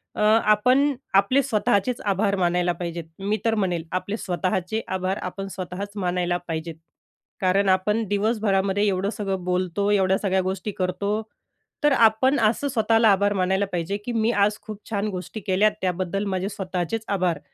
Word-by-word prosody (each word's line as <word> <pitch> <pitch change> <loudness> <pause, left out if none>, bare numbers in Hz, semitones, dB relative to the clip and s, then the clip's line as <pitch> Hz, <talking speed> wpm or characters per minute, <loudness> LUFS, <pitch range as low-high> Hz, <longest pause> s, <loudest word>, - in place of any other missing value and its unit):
अ, - - -3
आपण 225 +6 +4 0.2
आपले 200 +8 +4
स्वतःचेच 215 +2 0
आभार 200 0 +1
मानायला 175 0 +2
पाहिजेत, 170 -1 -4 0.2
मी 205 +2 -1
तर 225 - +2
म्हणेल, 180 -6 -1
आपले 200 +3 -2
स्वतःचे 185 +2 -2
आभार, 190 +1 -2
आपण 195 +2 -5
स्वतःच 185 +2 -5
मानायला 175 0 0
पाहिजेत. 160 0 -4 0.7
कारण 195 +1 +2
आपण 210 +4 +2
दिवसभरामध्ये 205 -1 +1
एवढं 195 +1 0
सगळं 195 -4 -2
बोलतो, 180 +2 0
एवढ्या 190 -2 +3
सगळ्या 190 -2 +1
गोष्टी 190 +2 -3
करतो, 200 +3 -2 0.6
तर 295 - +5
आपण 235 +4 +4
असं 225 +5 +2
स्वतःला 225 -3 +3
आभार 200 +1 +2
मानायला 190 +1 +1
पाहिजे, 175 +3 -2
की 245 - -3
मी 225 0 +1
आज 205 0 +2
खूप 210 -1 -8
छान 210 -1 -1
गोष्टी 185 +4 -6
केल्यात, 200 +3 +2
त्याबद्दल 185 +2 -1
माझे 190 0 -2
स्वतःचेच 195 +1 -3
आभार. 180 -5 0
200 Hz, 155 wpm, -24 LUFS, 185-215 Hz, 0.7 s, तर